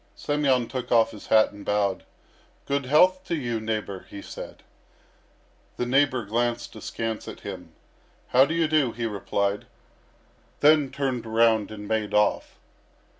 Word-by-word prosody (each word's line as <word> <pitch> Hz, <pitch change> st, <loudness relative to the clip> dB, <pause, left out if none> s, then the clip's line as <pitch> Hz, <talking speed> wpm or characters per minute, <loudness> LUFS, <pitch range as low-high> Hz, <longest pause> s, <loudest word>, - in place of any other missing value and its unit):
Semyon 140 Hz, -5 st, +1 dB
took 125 Hz, -1 st, -5 dB
off 115 Hz, -2 st, +4 dB
his 105 Hz, -, -12 dB
hat 110 Hz, -1 st, +4 dB
and 100 Hz, 0 st, -11 dB
bowed. 105 Hz, -1 st, 0 dB, 0.6 s
"Good 140 Hz, -2 st, -1 dB
health 185 Hz, +6 st, +4 dB
to 170 Hz, -, -1 dB
you, 120 Hz, -6 st, -2 dB
neighbour," 110 Hz, -3 st, -4 dB
he 100 Hz, -, -8 dB
said. -, -, -9 dB, 1.1 s
The 125 Hz, -, -1 dB
neighbour 130 Hz, -2 st, +2 dB
glanced 120 Hz, +2 st, -2 dB
askance 115 Hz, -1 st, -5 dB
at -, -, -9 dB
him. -, -, -8 dB, 0.6 s
"How 130 Hz, +2 st, +6 dB
do 160 Hz, +4 st, -3 dB
you 165 Hz, -1 st, +2 dB
do?" 150 Hz, -6 st, +2 dB
he 120 Hz, 0 st, -4 dB
replied; 100 Hz, -1 st, -2 dB, 0.9 s
then 150 Hz, -1 st, +5 dB
turned 130 Hz, -5 st, -3 dB
around 110 Hz, -1 st, +3 dB
and 105 Hz, -1 st, -8 dB
made 110 Hz, -1 st, -1 dB
off. 105 Hz, 0 st, +1 dB
120 Hz, 145 wpm, -25 LUFS, 110-140 Hz, 1.1 s, How